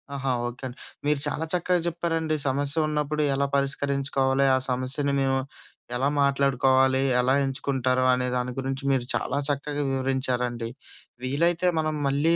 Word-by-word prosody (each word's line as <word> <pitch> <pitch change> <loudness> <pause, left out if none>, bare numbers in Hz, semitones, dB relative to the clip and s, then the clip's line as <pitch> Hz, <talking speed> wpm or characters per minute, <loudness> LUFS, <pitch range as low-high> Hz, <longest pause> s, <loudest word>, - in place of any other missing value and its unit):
ఆహా! 135 -1 -1 0.2
ఓకే 120 +2 -8
అండి. 125 - -10 0.3
మీరు 150 -1 +2
చాలా 160 - -2
చక్కగా 180 0 +1
చెప్పారండి. 165 -2 -1
సమస్య 140 +2 -1
ఉన్నప్పుడు 150 0 -1
ఎలా 140 +1 +1
పరిష్కరించుకోవాలి? 140 -1 +1
ఆ - - +3
సమస్యని 130 +3 -1
మేము 135 0 +2 0.6
ఎలా 130 +3 +1
మాట్లాడుకోవాలి? 135 -1 +3 0.2
ఎలా 125 +1 +3
ఎంచుకుంటారు? 130 -1 0
అనే 125 0 0
దాని 125 0 -1
గురించి 135 +1 -3
మీరు 130 -3 +1
చాలా 140 - -1
చక్కగా 145 +1 -2
వివరించారండి. 125 -3 -1 0.5
వీలైతే 170 +7 +1
మనం 155 -1 0
మళ్ళీ 145 +5 +2
135 Hz, 135 wpm, -26 LUFS, 130-145 Hz, 0.6 s, ఆ